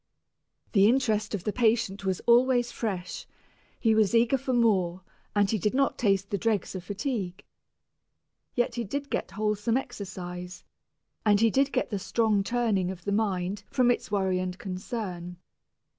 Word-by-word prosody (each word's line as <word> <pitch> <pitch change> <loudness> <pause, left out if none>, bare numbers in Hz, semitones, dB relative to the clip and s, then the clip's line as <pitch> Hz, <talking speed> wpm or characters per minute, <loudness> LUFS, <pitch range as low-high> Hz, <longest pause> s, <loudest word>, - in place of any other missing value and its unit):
The 200 -2 +5
interest 220 -5 +1
of 185 - -6
the 210 - -1
patient 220 -4 +1
was 190 -1 -1
always 245 0 +4
fresh, 190 -6 -4 0.5
he 225 -2 +3
was 215 0 +3
eager 240 +3 +4
for 265 +1 -3
more, 190 -7 +2 0.3
and 205 -1 +4
he 220 - 0
did 210 +7 0
not 275 0 +1
taste 195 -3 +1
the 200 - 0
dregs 220 -4 0
of 185 -2 -6
fatigue. 200 -3 -4 1.1
Yet 240 0 +1
he 235 0 -2
did 280 +7 -4
get - - -1
the - - -16
wholesome 215 +2 0
exercise, 180 -7 -6 0.6
and 205 -2 +4
he 225 0 +4
did 275 +3 +2
get - - -1
the 200 - -1
strong 210 +1 +1
turning 215 -5 0
of 180 -2 -7
the 200 - -1
mind 200 -2 -1
from 250 -3 +3
its - - -2
worry 190 -3 +1
and 185 0 -3
concern. 185 -3 -5
210 Hz, 165 wpm, -28 LUFS, 190-235 Hz, 1.1 s, The